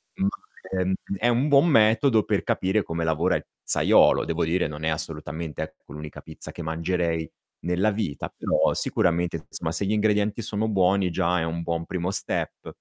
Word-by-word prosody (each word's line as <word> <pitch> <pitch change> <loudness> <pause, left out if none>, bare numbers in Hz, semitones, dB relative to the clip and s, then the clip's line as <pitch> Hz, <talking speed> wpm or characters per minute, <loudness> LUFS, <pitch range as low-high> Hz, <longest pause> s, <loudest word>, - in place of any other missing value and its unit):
ma 95 - +1
è 95 -1 -4 0.3
è 120 - +1
un 120 +4 +2
buon 140 +4 +6
metodo 115 -2 +4
per - - 0
capire 95 +3 +1
come 85 -2 -3
lavora 80 -1 +1
il - - -3
pizzaiolo. - - +3
Devo 80 +1 -1
dire, 85 +1 +1
non 75 +1 -7
è 80 - +1
assolutamente, 80 0 -4
ecco, - - -9
l'unica 75 0 -8
pizza 80 - -10
che 85 - -7
mangerei 80 0 -1 0.4
nella 90 +5 +2
vita, 100 -10 -4
però - - +2
sicuramente 85 0 0
insomma 80 - -4
se 85 +4 -1
gli 100 - 0
ingredienti 105 +1 +1
sono 110 +1 -2
buoni 95 -2 +2
già 90 +1 +1
è - - 0
un 80 +1 -3
buon 85 0 -2
primo 90 0 -2
step. 95 -1 -3
90 Hz, 180 wpm, -25 LUFS, 80-105 Hz, 0.4 s, buon